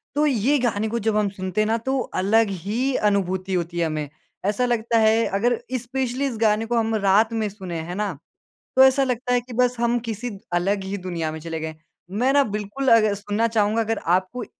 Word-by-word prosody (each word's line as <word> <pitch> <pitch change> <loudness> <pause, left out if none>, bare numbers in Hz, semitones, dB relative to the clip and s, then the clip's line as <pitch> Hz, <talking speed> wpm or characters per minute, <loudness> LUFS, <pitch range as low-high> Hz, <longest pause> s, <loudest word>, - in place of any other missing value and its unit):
तो 300 +1 +3
ये 275 +1 +2
गाने 220 -3 0
को 235 +1 -1
जब 220 0 0
हम 205 -2 +2
सुनते 190 +1 -2
हैं - - +2
ना, 225 +1 +1
तो 265 +3 -1
अलग 220 +1 +2
ही 215 +9 -2
अनुभूति 190 -2 0
होती 175 -1 -2
है 165 - +2
हमें। 155 -2 -3 0.4
ऐसा 210 +5 +1
लगता 235 -1 +1
है, 220 +1 +4
अगर 230 +5 +1 0.2
स्पेशली 260 +2 -2
इस 245 -5 -3
गाने 215 0 +3
को 240 +1 -1
हम 225 0 +1
रात 210 +3 +3
में 220 -2 0
सुनें, 185 -5 -6
है 175 +2 -6
ना? 205 -3 -2 0.6
तो 260 - +8
ऐसा 265 +1 +4
लगता 250 0 -2
है 245 - +3
कि 245 +1 -13
बस 250 +1 +2
हम 240 0 +2
किसी 225 +3 -3 0.2
अलग 190 +3 0
ही 195 +1 -3
दुनिया 170 -4 -3
में 160 - -7
चले 165 0 -5
गए। 160 0 -5 0.4
मैं 245 +7 +1
ना, 285 -1 +4
बिल्कुल 210 +5 -3
अग 215 -2 +5
सुनना 205 +3 -1
चाहूँगा, 220 0 +1
अगर 225 0 -1
आप 185 +2 +1
कोई 245 -3 -5
215 Hz, 220 wpm, -23 LUFS, 195-240 Hz, 0.6 s, तो